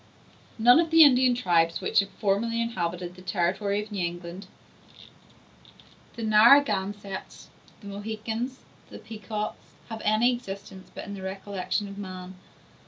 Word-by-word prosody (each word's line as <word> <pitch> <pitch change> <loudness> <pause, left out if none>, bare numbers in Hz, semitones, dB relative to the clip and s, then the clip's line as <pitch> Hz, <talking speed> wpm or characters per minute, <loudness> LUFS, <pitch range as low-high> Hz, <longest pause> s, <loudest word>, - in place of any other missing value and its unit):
None 245 +6 +6
of 335 -1 +1
the 325 0 +8
Indian 255 -3 +5
tribes 170 -7 +2
which - - +2
formerly 225 +3 0
inhabited 180 -6 -3
the 185 - -14
territory 200 +3 -1
of 210 - -14
New 195 -3 -2
England—the 175 +5 -12
Naragansetts, 210 -4 +3 0.3
the - - -14
Mohicans, 220 +5 -5 0.3
the - - -10
Pecots—have 220 +1 -7
any 220 +4 +3
existence 195 -5 -8
but - - -6
in 205 - -7
the 195 - -7
recollection 195 +1 -3
of 200 0 -9
man. 185 -1 -7
205 Hz, 120 wpm, -26 LUFS, 190-230 Hz, 0.3 s, the